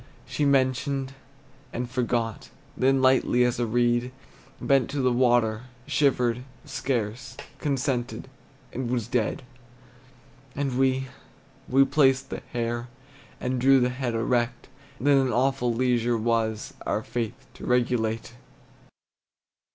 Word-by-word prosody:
She 145 - -1
mentioned, 135 0 +1 0.6
and 125 +1 -3
forgot; 120 -3 -2 0.3
Then 135 +1 +2
lightly 130 -1 +4
as 125 0 0
a 120 - 0
reed 120 +2 +1 0.5
Bent 135 -3 +2
to 145 - -3
the 130 -1 +2
water, 120 -2 +2 0.2
shivered 125 -4 +1 0.2
scarce, 125 0 -3 0.2
Consented, 135 -4 -2 0.5
and 125 -1 -3
was 120 -3 -1
dead. 120 +1 -1 1.1
And 140 -2 -1
we, 130 0 +2 0.6
we 135 +2 +5
placed 135 -1 +2
the - - -4
hair, 120 0 -2 0.5
And 125 0 -2
drew 135 +1 +6
the 125 0 +2
head 125 -2 -3
erect; 120 +2 -1 0.3
And 125 - -7
then 145 -1 +6
an 130 -2 +1
awful 125 0 +1
leisure 120 -1 +1
was, 110 -1 -1
Our - - -1
faith 120 +2 -4
to - - -9
regulate. 120 -2 0
125 Hz, 120 wpm, -26 LUFS, 120-135 Hz, 1.1 s, drew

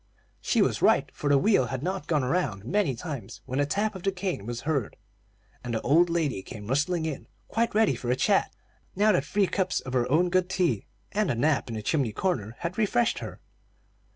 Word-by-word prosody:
She - - +2
was - - -1
right, - - +4
for 145 - -2
the 140 - +5
wheel 135 - +3
had 130 +2 -4
not 185 +2 -3
gone 150 -5 +1
around 125 - -1
many 175 - +1
times, 130 - -7
when 130 +2 -3
the 145 - +2
tap 210 +7 0
of 190 - -8
the 195 - +1
cane 180 - -4
was 120 0 -4
heard, 140 -6 -2 0.7
and 120 -1 -3
the 110 - -1
old 165 +6 +4
lady 160 - 0
came 105 0 -9
rustling 150 - 0
in, 155 -3 -5 0.2
quite 230 -1 0
ready 220 0 +4
for 120 - -5
a 125 - +3
chat, - - +2 0.4
now 210 +2 +4
that 180 -8 +2
three 200 +5 +2
cups 185 -1 0
of 130 - -7
her 125 -1 +1
own 175 +4 +3
good 185 0 +2
tea 175 - 0 0.2
and 210 -2 0
a - - +1
nap 140 +2 +1
in 115 - -4
the 110 - -5
chimney 130 -4 0
corner 115 - -2
had 175 +4 -3
refreshed 230 +2 +2
her. - - -8
155 Hz, 215 wpm, -27 LUFS, 125-185 Hz, 0.7 s, the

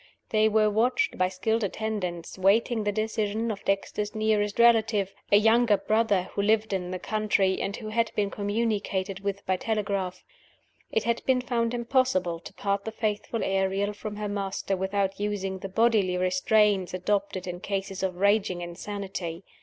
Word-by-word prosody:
They 215 0 +4
were 215 0 +3
watched 245 - +1
by 185 0 +3
skilled 220 +4 -1
attendants, 195 -5 -3
waiting 215 +4 +2
the 205 - +2
decision 220 +1 -1
of 205 -1 -7
Dexter's 205 +2 -1
nearest 215 -1 +1
relative 220 -4 +4 0.2
(a 205 - +8
younger 225 0 +4
brother, 215 -4 +2
who - - 0
lived 215 0 +2
in 180 -2 -2
the 185 - -3
country, 210 -2 +1
and 200 - -2
who 215 -2 -7
had 230 +1 0
been 200 -1 0
communicated 205 -2 -1
with 200 0 -4
by 185 -1 +1
telegraph). 200 -4 -2 0.7
It 220 - +1
had 235 0 -1
been 260 -1 +4
found 240 -1 -1
impossible 235 -9 +1
to - - -11
part 200 0 -1
the 220 - -4
faithful 220 +1 -2
Ariel 195 +1 0
from 210 0 -6
her 210 0 -3
master 195 -1 -2
without 195 +1 -1
using 195 -2 -2
the 195 - -6
bodily 205 -3 +2
restraints 185 +1 +2
adopted 195 0 -1
in 180 -1 -5
cases 195 0 -3
of 190 -2 -1
raging 200 -1 +2
insanity. 175 -1 -5
205 Hz, 160 wpm, -27 LUFS, 190-220 Hz, 0.7 s, a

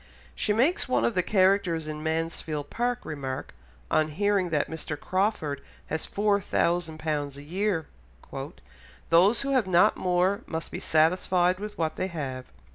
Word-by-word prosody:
She 210 - -1
makes 260 +8 +2
one - - +2
of 235 - +1
the 180 - +3
characters 185 -4 +2
in 155 0 -5
Mansfield 160 -2 -3
Park 245 0 -1
remark, 135 -4 -5 0.4
on 155 - +3
hearing 195 +3 +1
that 150 -3 +1
Mr. 160 -2 -5
Crawford 185 -8 -1 0.3
has 160 - -3
four 205 0 +1
thousand 170 -3 0
pounds 150 -3 -2
a 140 - -9
year, 180 +1 -1 1.3
"'Those 185 +7 +5
who 275 0 -2
have 255 -7 +2
not 175 -1 +4
more 185 +3 +1
must 160 0 -4
be - - -4
satisfied 180 +3 +2
with 210 0 -6
what 160 -1 -1
they 185 - -1
have. 135 -7 -5
175 Hz, 155 wpm, -27 LUFS, 155-200 Hz, 1.3 s, Those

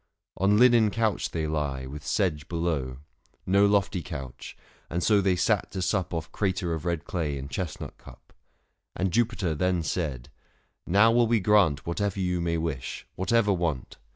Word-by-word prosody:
On 100 +2 +3
linen 120 -2 +6
couch 110 0 0
they 80 -1 -2
lie, 75 -4 -2
with 70 +2 -8
sedge 80 -5 -1
below 80 -7 -2 0.2
— - - -39
No 100 +1 +6
lofty 100 -2 +1
couch: 70 -8 -8 0.3
and 85 +2 -2
so 105 -2 +4
they 95 -1 +2
sat 100 +4 +1
to 95 - -3
sup 95 -2 0
Off 80 -1 -4
crater 95 -3 -1
of 80 0 -5
red 85 -3 -2
clay 75 -6 -2
and 70 +1 -7
chestnut 90 -5 -5
cup. - - -16 0.6
And 95 0 0
Jupiter 110 -7 +1
then 90 +2 0
said, 75 -6 -3 0.6
"Xow 100 +5 +5
will 120 0 +4
we 115 0 +3
grant 95 -8 +3
590 - - -31
Whatever 100 +3 -1
you 90 -2 0
may 85 -1 0
wish, 75 -5 -4
whatever 105 +2 +2
want." 85 -8 -2
90 Hz, 175 wpm, -27 LUFS, 80-100 Hz, 0.6 s, linen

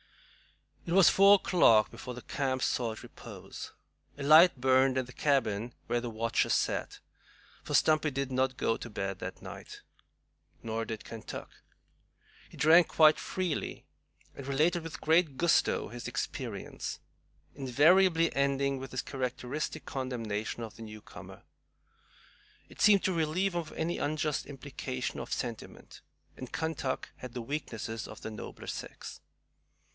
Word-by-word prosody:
It 170 - -3
was 190 -1 +7
four 200 +1 +7
o'clock 115 - +4
before 125 -1 -8
the 125 - -9
camp 130 -2 -2
sought 115 -3 -1
repose. - - -10 0.5
A 140 - -5
light 155 +1 +7
burnt 130 +1 +4
in 130 - 0
the 125 - -13
cabin 120 -5 0
where 120 - 0
the 120 - -4
watchers 115 +1 +1
sat, - - -1 0.6
for - - -2
Stumpy 155 0 +4
did 140 -1 -3
not 130 0 0
go 115 - +1
to 120 - -8
bed 95 -3 -4
that - - -7
night. - - -10 0.8
Nor 115 0 -2
did 110 -2 -6
Kentuck. 115 -1 -8 1.0
He - - -14
drank 165 +3 +6
quite 155 -1 +5
freely, 185 -4 -3 0.5
and 140 - -8
related 155 +6 +2
with 160 0 -7
great 160 -3 +2
gusto 170 -1 +2
his 120 0 -7
experience, - - -5 0.5
invariably 165 +6 +4
ending 140 0 +1
with 135 0 -7
his 130 - -3
characteristic 130 +2 -4
condemnation 115 -4 -3
of 110 - -9
the - - -11
newcomer. 110 -1 -11 1.3
It - - -11
seemed 205 -2 +6
to 190 - +1
relieve 170 +4 0
him 175 - 0
of 155 - -11
any 170 +2 -2
unjust 150 0 -1
implication 135 -2 -5
of - - -7
sentiment, 120 -3 -6 0.3
and 130 - -9
Kentuck 160 -5 -3
had 125 -1 -9
the 120 - -3
weaknesses 115 -5 -4
of - - -11
the 110 - -6
nobler 105 - -9
sex. - - -7
135 Hz, 140 wpm, -30 LUFS, 120-160 Hz, 1.3 s, was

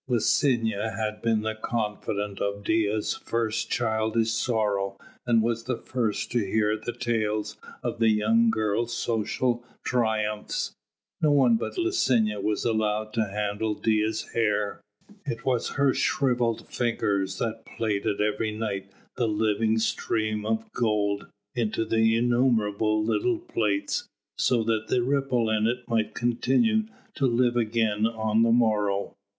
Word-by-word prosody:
Licinia 115 -3 +1
had 105 -1 -3
been 115 -2 +1
the 110 0 -1
confidante 105 -3 -3
of 100 0 -2
Dea's 110 0 +1
first 115 -1 -2
childish 110 -1 +1
sorrow 105 -4 0 0.3
and 115 -2 +4
was 115 0 -1
the 125 -2 -1
first 115 -5 -2
to 120 - +2
hear 105 +2 +1
the 110 +2 -4
tales 110 -3 -1 0.3
of 120 -1 -3
the 115 -1 +4
young 110 +2 +3
girl's 110 +2 0
social 120 +2 -1 0.2
triumphs. 110 -3 -1 0.5
No 155 - +4
one 135 -5 +5
but 115 - -3
Licinia 125 - +1
was 105 +1 -1
allowed 110 -1 0
to 110 -2 +1
handle 105 +1 -2
Dea's 110 0 0
hair. 105 -2 0 0.4
It 115 -7 -5
was 125 -3 0
her 140 -2 +4
shrivelled 120 -4 0
fingers 100 -5 -1
that 115 0 -3
plaited 105 -3 -2
every 105 +1 0
night 100 -3 -4 0.3
the 120 -2 +1
living 110 +1 +1
stream 110 -1 -1
of 110 0 0
gold 105 -3 0 0.3
into 115 -2 0
innumerable 110 -2 +2
little 350 - +1
plaits, 110 - -1 0.3
so 120 -3 +2
that 110 -1 0
the 125 - +1
ripple 130 -4 +1
in 110 0 +2
it 125 +1 -2
might 110 -2 0
continue 135 - +2 0.3
to 135 - +1
live 120 0 +2
again 110 -2 +1
on 110 -1 0
the 115 0 +4
morrow. 105 -4 +2
110 Hz, 135 wpm, -26 LUFS, 105-120 Hz, 0.5 s, one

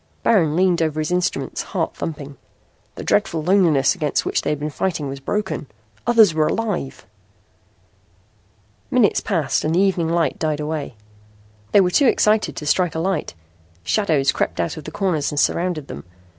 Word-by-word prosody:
Baron 165 -9 +3
leaned 180 -1 +2
over 155 -1 -1
his 155 +2 -2
instruments, 180 0 -1
heart - - -3
thumping. 145 -3 -6 0.6
The - - -7
dreadful 160 -2 0
loneliness 165 -7 +3
against 150 -3 -1
which - - 0
he - - -2
had 150 -1 -1
been 150 +1 -3
fighting 160 -2 -2
was 135 0 -6
broken. 205 0 -3 0.4
Others 225 -7 +5
were 155 -1 +2
alive! 205 -11 -3 1.8
Minutes - - +3
passed - - 0
and 155 +2 0
the - - +3
evening 185 -4 +1
light 170 -1 0
died 155 -2 -1
away. 150 -4 -4 0.8
They 200 - +6
were 180 -1 +1
too 275 +8 +4
excited 215 -2 +2
to 150 - -6
strike 170 +2 +1
a - - -1
light. 175 - -2 0.5
Shadows 150 - +1
crept - - -2
out 85 - -1
of 155 - -9
the 155 - -7
corners 170 -6 -1
and 145 - -1
surrounded 170 -2 0
them. 70 - -8
160 Hz, 170 wpm, -21 LUFS, 150-185 Hz, 1.8 s, They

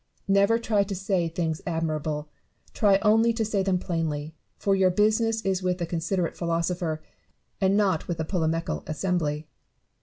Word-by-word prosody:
Never 200 +3 +4
try 220 -3 +1
to 200 0 -2
say 185 -2 0
things 160 -1 -2
admirably; 155 -2 -1 0.5
try 200 -3 +4
only 225 +2 +4
to 225 -1 -1
Bay 205 -2 0
them 190 -1 +1
plainly; 160 -4 -3 0.2
for 200 - +1
your 190 -1 +4
business 220 +3 +2
is 190 -1 0
with 180 -1 0
the 175 - -2
considerate 170 +1 -1
philosopher, 170 -1 -1 0.6
and 195 +1 +3
not 190 -6 +1
with 175 - -2
the 160 - -2
polemical 165 -1 -1
assembly. 155 -2 -1
180 Hz, 155 wpm, -26 LUFS, 165-200 Hz, 0.6 s, Never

